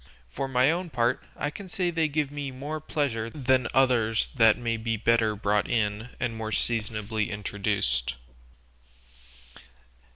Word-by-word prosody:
For 135 - -3
my 130 +2 +4
own 175 +1 -2
part, 120 -5 +1
I 145 - -2
can 190 +4 -9
say 180 -1 0
they 165 -2 +1
give 150 -1 -1
me 145 -1 -4
more 145 +4 -5
pleasure 130 -7 -1
than 130 -2 +1
others 120 -4 +3
that 115 -4 +5
may 115 -2 -1
be 115 0 -2
better 110 -1 +2
brought 105 0 +1
in 110 0 0
and 120 -2 -1
more 110 -1 -4
seasonably 110 -1 -1
introduced." 100 - -1
115 Hz, 140 wpm, -27 LUFS, 110-140 Hz, -, that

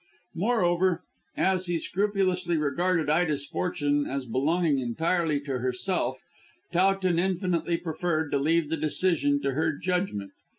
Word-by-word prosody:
Moreover, 180 -3 +1 0.3
as 185 -1 +1
he 175 -1 0
scrupulously 185 -2 0
regarded 160 +3 +1
Ida's 150 -2 +1
fortune 145 -3 -1
as 135 -1 -3
belonging 145 +5 +1
entirely 160 +5 0
to 135 -3 -3
herself, 130 +2 -1 0.6
Towton 185 -1 +2
infinitely 175 -2 0
preferred 160 -2 -2
to 140 - +2
leave 160 +2 +1
the 165 - 0
decision 150 -2 +1
to 140 - +1
her 155 +3 0
judgment. 180 - -2
165 Hz, 125 wpm, -27 LUFS, 145-180 Hz, 0.6 s, Towton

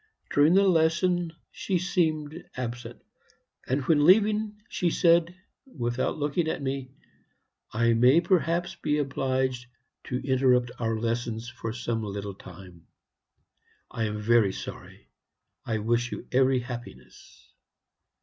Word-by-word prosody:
During 150 +5 +5
the 200 0 +5
lesson 170 0 +2 0.2
she 190 - -2
seemed 160 -3 -1
absent; 120 -1 -6 0.6
and 135 +2 0
when 145 +1 +3
leaving 210 +4 +3
she 175 - 0
said, 170 +1 +3 0.3
without 120 - -2
looking 150 +3 -1
at - - -2
me, 135 -1 -3 0.8
'I 115 +1 +2
may 125 +7 +5
perhaps 175 0 +1
be 150 -2 -1
obliged 130 -3 -1 0.4
to 125 - -3
interrupt 125 -2 +3
our 115 -1 -1
lessons 115 0 -3
for 115 -2 -6
some 120 -1 -3
little 100 -1 -5
time; 90 -2 -14 1.0
I 115 -2 -2
am 105 0 -3
very 105 -2 +3
sorry. - - -10 0.6
I 110 - 0
wish 120 +3 0
you - - -7
every 130 0 +3
happiness.' 120 -1 -11
130 Hz, 120 wpm, -27 LUFS, 120-165 Hz, 1.0 s, During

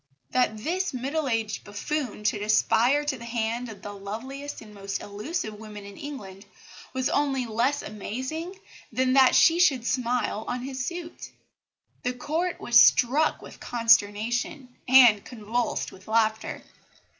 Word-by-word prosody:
That 250 -4 +1
this 350 - -2
middle 275 +4 -2
aged 225 -2 -2
buffoon 210 +2 -4
should 210 0 0
aspire 245 +6 +3
to 270 -4 -2
the - - -9
hand 235 +1 -2
of 205 -3 -11
the 205 - -6
loveliest 260 +9 -7
and 215 -1 -13
most 195 -1 -4
elusive 215 - -5
woman 210 -2 -9
in 200 0 -10
England 205 -9 -9 0.4
was 260 0 -1
only 275 -3 0
less 240 +6 0
amazing 260 - -5 0.3
than 255 +2 +1
that 265 -1 +6
she 335 +1 +5
should 275 -10 +3
smile 245 -3 -1
on 245 0 -3
his 265 -1 -4
suit. 345 -1 -7 0.7
The 250 - -1
Court 320 +8 -2
was 240 0 +6
struck 285 +6 +4
with - - -12
consternation 230 +3 +1
and 245 -5 +7
convulsed 235 0 -3
with 190 +1 -16
laughter. 220 0 0
245 Hz, 145 wpm, -26 LUFS, 215-275 Hz, 0.7 s, and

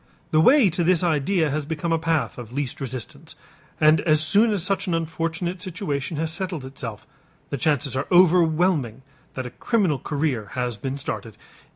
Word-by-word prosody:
The 155 - +4
way 250 - +5
to 175 +2 -1
this 180 0 +3
idea 160 0 +1
has 150 0 -3
become 160 +1 -3
a 165 - +1
path 160 -5 -1
of 120 -2 -9
least 140 0 -4
resistance, 130 -2 -6 0.4
and 155 0 +5
as 155 -2 +3
soon 205 +9 +3
as 200 -5 0
such 195 +1 0
an 175 - +1
unfortunate 165 +2 -3
situation 165 -6 -3
has 160 +1 0
settled 175 -6 -3
itself, 125 -5 -7 0.5
the 140 - -1
chances 145 0 0
are 130 - -2
overwhelming 170 - +3 0.3
that 130 - -4
a 125 - -6
criminal 190 - 0
career 140 -7 -2
has 125 -2 -2
been 130 +6 -4
started. 115 -5 -5
155 Hz, 175 wpm, -23 LUFS, 135-175 Hz, 0.5 s, way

